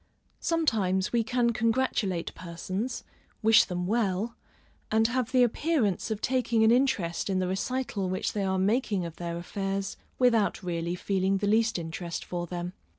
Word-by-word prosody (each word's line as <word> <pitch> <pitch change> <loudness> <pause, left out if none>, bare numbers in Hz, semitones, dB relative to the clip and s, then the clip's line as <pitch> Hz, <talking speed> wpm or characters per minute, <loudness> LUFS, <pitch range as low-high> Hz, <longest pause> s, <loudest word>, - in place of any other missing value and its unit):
Sometimes 210 - +1
we 235 -1 +3
can 245 0 +1
congratulate 230 -6 0
persons, 185 +7 -4 0.4
wish 220 0 +7
them 180 -1 -3
well, 215 +1 0 0.5
and 220 +1 +3
have 255 0 -1
the 255 -1 +5
appearance 240 - +1
of 215 -1 -3
taking 240 -3 +2
an 220 - +6
interest 225 -10 +1
in 190 - +1
the 185 -1 0
recital 200 0 -2
which 185 - -1
they 205 - -1
are 190 0 0
making 200 -1 +1
of 165 -1 -8
their 170 -1 -4
affairs, 195 +2 -3 0.2
without 230 -6 +2
really 170 -1 -2
feeling 195 +1 0
the 205 - -2
least 225 +2 +2
interest 170 +1 -5
for 175 -1 -4
them. 175 +1 -4
200 Hz, 155 wpm, -28 LUFS, 180-235 Hz, 0.5 s, wish